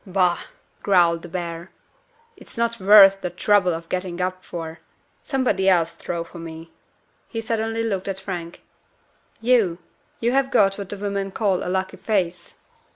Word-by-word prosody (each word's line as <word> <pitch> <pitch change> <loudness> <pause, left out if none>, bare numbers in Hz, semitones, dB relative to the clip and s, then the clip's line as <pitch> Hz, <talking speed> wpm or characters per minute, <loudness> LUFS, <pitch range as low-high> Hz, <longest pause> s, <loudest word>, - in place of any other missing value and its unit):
"Bah!" 180 -3 +1 0.4
growled 175 -4 +3
the 175 - -9
Bear. 170 0 -5 0.7
"It's - - -10
not 235 0 0
worth 195 0 +7
the 180 - -2
trouble 185 +1 +2
of 165 0 -5
getting 180 -1 -3
up 185 0 -2
for. 165 -1 -7 0.4
Somebody 245 -9 +1
else 170 -3 +2
throw 170 -1 -4
for 170 +1 -12
me." 165 0 -9 0.6
He 225 - -5
suddenly 225 0 -1
looked 200 -4 -2
at 195 -1 -3
Frank. 180 -3 -7 0.8
"You! 225 -8 +3 0.4
you 235 +1 +1
have 270 +1 +2
got 195 -4 +3
what 200 -2 -6
the 205 - -5
women 200 -1 -2
call 195 -2 0
a - - -3
lucky 190 +1 -2
face." 180 -5 -2
190 Hz, 160 wpm, -23 LUFS, 175-205 Hz, 0.8 s, worth